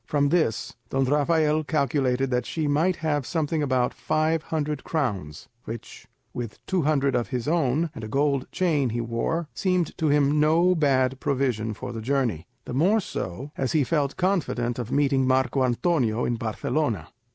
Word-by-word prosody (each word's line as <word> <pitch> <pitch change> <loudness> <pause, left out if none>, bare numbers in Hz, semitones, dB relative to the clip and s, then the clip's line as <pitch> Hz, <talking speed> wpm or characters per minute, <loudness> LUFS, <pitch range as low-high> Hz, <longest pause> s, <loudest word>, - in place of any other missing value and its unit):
From 145 -1 +2
this 155 -9 0 0.2
Don 135 0 +1
Rafael 150 +2 +2
calculated 135 -4 0
that 125 0 0
she 160 -2 -2
might 160 +6 +2
have 145 -2 +1
something 160 +2 -1
about 130 -3 +1
five 155 +1 0
hundred 150 -2 -3
crowns, 100 - -3 0.2
which, 115 0 -8 0.3
with 120 -3 -5
two 185 -2 0
hundred 140 -3 +2
of 120 -1 0
his 125 -1 -3
own, 160 0 +1
and 110 - -8
a - - -4
gold 140 +2 0
chain 155 -8 +1
he 115 +1 -2
wore, 120 +8 -2
seemed 180 -3 0
to 160 - +1
him 145 0 +3
no 165 +4 +4
bad 135 -5 +2
provision 120 -6 -1
for - - -6
the 115 - -5
journey; 120 - -1 0.2
the - - -6
more 185 - +3
so, 130 - -5
as 130 - -1
he 155 -3 +3
felt 145 -1 0
confident 140 -11 0
of 120 0 -4
meeting 135 -2 +2
Marco 130 0 +2
Antonio 125 -3 +1
in 120 - 0
Barcelona. 115 - -2
140 Hz, 170 wpm, -25 LUFS, 125-155 Hz, 0.3 s, no